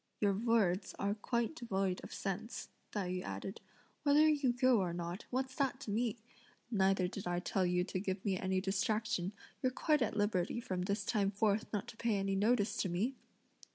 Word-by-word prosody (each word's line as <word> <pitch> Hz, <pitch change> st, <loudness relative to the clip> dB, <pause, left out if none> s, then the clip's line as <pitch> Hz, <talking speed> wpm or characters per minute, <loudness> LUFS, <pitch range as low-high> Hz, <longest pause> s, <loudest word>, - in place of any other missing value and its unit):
"Your 200 Hz, -2 st, +3 dB
words 200 Hz, -3 st, +2 dB
are 200 Hz, +1 st, 0 dB
quite 235 Hz, +5 st, -1 dB
devoid 195 Hz, -8 st, -1 dB
of -, -, -8 dB
sense," 210 Hz, +4 st, -4 dB, 0.2 s
Tai 200 Hz, -3 st, -2 dB
yü 180 Hz, 0 st, -2 dB
added; 100 Hz, -, -5 dB, 0.4 s
"whether 295 Hz, +1 st, +5 dB
you 290 Hz, -4 st, +3 dB
go 250 Hz, -1 st, +4 dB
or 180 Hz, -3 st, 0 dB
not 175 Hz, +3 st, -4 dB
what's 260 Hz, +1 st, -1 dB
that 270 Hz, -2 st, +1 dB
to 215 Hz, -, -4 dB
me? 230 Hz, +1 st, 0 dB, 0.5 s
neither 195 Hz, -3 st, +3 dB
did 195 Hz, 0 st, -5 dB
I 175 Hz, 0 st, 0 dB
tell 185 Hz, +1 st, +1 dB
you 180 Hz, 0 st, +2 dB
to 185 Hz, 0 st, -3 dB
give 190 Hz, 0 st, -3 dB
me 195 Hz, -2 st, +2 dB
any 190 Hz, 0 st, 0 dB
distraction; 200 Hz, -1 st, 0 dB, 0.3 s
you're 255 Hz, -, +2 dB
quite 300 Hz, +2 st, +2 dB
at 220 Hz, -2 st, 0 dB
liberty 205 Hz, 0 st, +1 dB
from 185 Hz, -6 st, -3 dB
this 200 Hz, +3 st, -1 dB
time 205 Hz, -4 st, +2 dB
forth 205 Hz, +1 st, +1 dB
not 205 Hz, -3 st, -2 dB
to 225 Hz, -, -11 dB
pay 230 Hz, -3 st, +1 dB
any 195 Hz, 0 st, 0 dB
notice 215 Hz, +1 st, +2 dB
to 190 Hz, -, 0 dB
me!" 200 Hz, +10 st, 0 dB
205 Hz, 190 wpm, -35 LUFS, 190-235 Hz, 0.5 s, whether